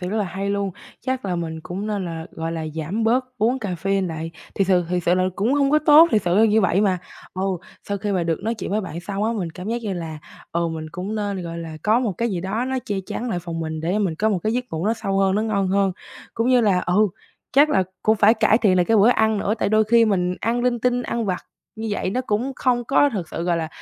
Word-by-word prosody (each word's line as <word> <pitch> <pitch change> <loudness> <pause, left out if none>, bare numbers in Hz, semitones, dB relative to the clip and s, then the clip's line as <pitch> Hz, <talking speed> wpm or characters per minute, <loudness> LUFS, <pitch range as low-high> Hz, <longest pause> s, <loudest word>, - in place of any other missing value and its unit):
sự 180 - -3
rất 215 - -2
là 205 - +1
hay 195 +2 -3
luôn. 200 -1 -1 0.3
Chắc 260 -1 -3
là 180 -2 -1
mình 160 -1 -4
cũng 195 +4 -5
nên 205 -3 -2
là, 165 -2 -5
gọi 165 0 -4
là, 160 -1 -4
giảm 170 +8 -2
bớt 250 +3 +3
uống 230 +5 +2
caffeine 195 -1 -1
lại. 165 0 -5 0.2
Thiệt 195 - +1
sự 180 -2 +3
thiệt 180 0 -1
sự 175 - +3
là 185 - +2
nó - - +1
cũng 225 +8 +1
hông 280 -1 +2
có 305 - +5
tốt, 305 +2 +7
thiệt 210 -3 +2
sự 175 0 +1
là 220 - +6
như 220 0 +4
vậy 190 0 +2
mà. 190 -3 +2 0.4
Ừ, 185 - -3 0.5
sau 200 0 -1
khi 205 0 -2
mà 180 -2 +1
được 165 -2 0
nói 225 +2 -1
chuyện 220 - -6
với 215 +2 +1
bạn 170 -3 -6
xong 200 +3 -3
á, 230 - +1
mình 185 -7 -3
cảm 180 +5 -8
giác 235 +1 -2
như 205 -3 -2
là, 165 -3 -5 0.3
ừ, 170 0 0
mình 160 -1 -5
cũng 185 +5 -4
nên, 205 -3 -2
gọi 170 0 -6
là, 160 -1 -7
có 220 +3 +3
một 230 -6 0
cái 230 +5 -2
gì 180 - -2
đó 200 +7 -2
nó 260 0 -1
che 205 - -2
chắn 245 - -4
lại 180 - -1
phòng 170 -1 -5
mình 160 -1 -4
để 180 +6 0
mình 190 -6 0
có 215 +7 +1
một 205 -4 +1
cái 215 +5 -1
giấc 250 +1 -1
ngủ 165 +5 -2
nó 225 - +3
sâu 195 -3 -2
hơn, 195 0 +3
nó 215 - +1
ngon 200 -4 0
hơn. 195 -1 +2 0.4
Cũng 230 +2 0
như 250 -1 +5
là 195 -5 +3
ừ, 205 +4 +2 0.4
chắc 290 +3 +5
là 190 - +3 0.2
cũng 220 +1 +3
phải 215 +2 +5
cải 220 0 +3
thiện 195 -6 +3
lại 180 - +4
cái 225 +2 +3
bữa 210 +3 +6
ăn 220 -3 +3
nữa 200 +1 0
tại - - +1
đôi 215 +1 +4
khi 230 +1 +5
mình 180 -4 +1
ăn 235 +2 0
linh 245 -1 +1
tinh, 245 0 +1
ăn 235 -1 -2
vặt 185 -3 -1 0.4
như 220 0 -4
vậy 195 -2 -1
nó 255 - 0
cũng 235 +6 0
không 240 -2 +1
có 280 +3 +3
thật 180 -6 -4
sự, 165 - -4
gọi 175 -1 +1
là, 160 -1 -2
200 Hz, 285 wpm, -22 LUFS, 180-225 Hz, 0.5 s, tốt